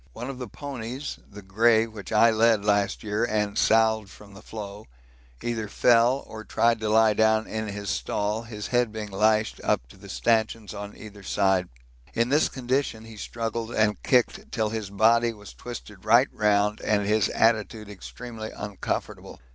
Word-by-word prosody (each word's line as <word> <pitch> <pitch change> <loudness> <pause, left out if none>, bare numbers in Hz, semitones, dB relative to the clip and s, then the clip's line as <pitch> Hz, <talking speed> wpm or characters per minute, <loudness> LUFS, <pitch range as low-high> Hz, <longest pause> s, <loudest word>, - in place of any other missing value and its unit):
One 125 - -5
of 130 - -10
the 125 - -5
ponies 135 -1 -6
(the 105 0 -11
grey 110 +4 +3
which 110 -3 -10
I 115 +1 +5
led 110 -2 +3
last 100 -1 +1
year 105 +1 -1
and 105 -3 0
salved 110 -2 +3
from 100 +1 -15
the 100 - -12
floe) 105 -1 -8 0.6
either 115 -2 -2
fell 120 +5 +3
or 110 0 -9
tried 115 +2 +2
to 110 -1 -2
lie 110 0 +5
down 110 +1 +3
in 110 0 -4
his 100 -1 -4
stall, 105 +2 -1
his 110 -3 -7
head 120 -1 +1
being 105 -1 -6
lashed 110 +2 +1
up - - +1
to - - -16
the - - -13
stanchions 110 - 0
on 105 0 -8
either 105 -1 -11
side. 95 -2 +1 0.5
In 115 +1 +1
this 150 +3 +3
condition 130 -3 -2
he 115 -1 -11
struggled 115 +1 -4
and 105 -1 +1
kicked 195 - +1
till 110 -3 0
his 110 -2 -4
body 115 +3 +3
was 105 -2 -12
twisted 105 -5 -9
right 120 +5 +5
round 105 0 +1
and 105 -1 +1
his 105 -1 +2
attitude 110 -1 +1
extremely 110 +3 -8
uncomfortable. 105 -2 -5
110 Hz, 170 wpm, -26 LUFS, 105-115 Hz, 0.6 s, I